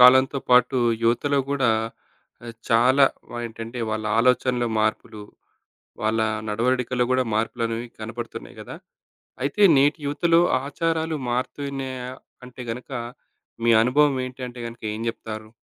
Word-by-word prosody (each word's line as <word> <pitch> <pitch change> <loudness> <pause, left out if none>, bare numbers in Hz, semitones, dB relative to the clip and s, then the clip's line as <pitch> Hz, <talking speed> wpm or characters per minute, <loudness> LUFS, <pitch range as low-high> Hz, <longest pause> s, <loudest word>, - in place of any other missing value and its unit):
కాలంతో 130 +2 +7
పాటు 125 +1 +5 0.3
యువతలో 140 +5 +2
గూడా 140 -3 +1 0.8
ఆహ్, 115 - -6 0.2
చాలా 125 +4 +5 0.3
వ 120 - -6
ఏంటంటే, 115 +1 -8
వాళ్ళ 110 0 -2
ఆలోచనలో 125 0 +2
మార్పులు. 110 0 -2 0.8
వాళ్ళ 110 +1 +1 0.3
నడవడికలో 125 +3 +1
గూడా 130 0 +3
మార్పులనేవి 115 +1 -1
కనపడుతున్నాయి 115 +2 -7
గదా! - - -8 0.7
అయితే 140 +10 0
నేటి 145 +4 +4
యువతలో 165 +4 +3 0.2
ఆచారాలు 160 +2 -1
మారుతున్నాయా 130 0 -3 0.4
అంటే 125 0 -10
గనక, 125 +2 -6 0.8
మీ 120 - +4
అనుభవం 140 +3 +3
ఏంటి 130 +1 -10
అంటే 120 0 -10
గనక 115 0 -10
ఏం 110 - -6
జెప్తారు? 110 -1 -6
125 Hz, 120 wpm, -24 LUFS, 115-135 Hz, 0.8 s, కాలంతో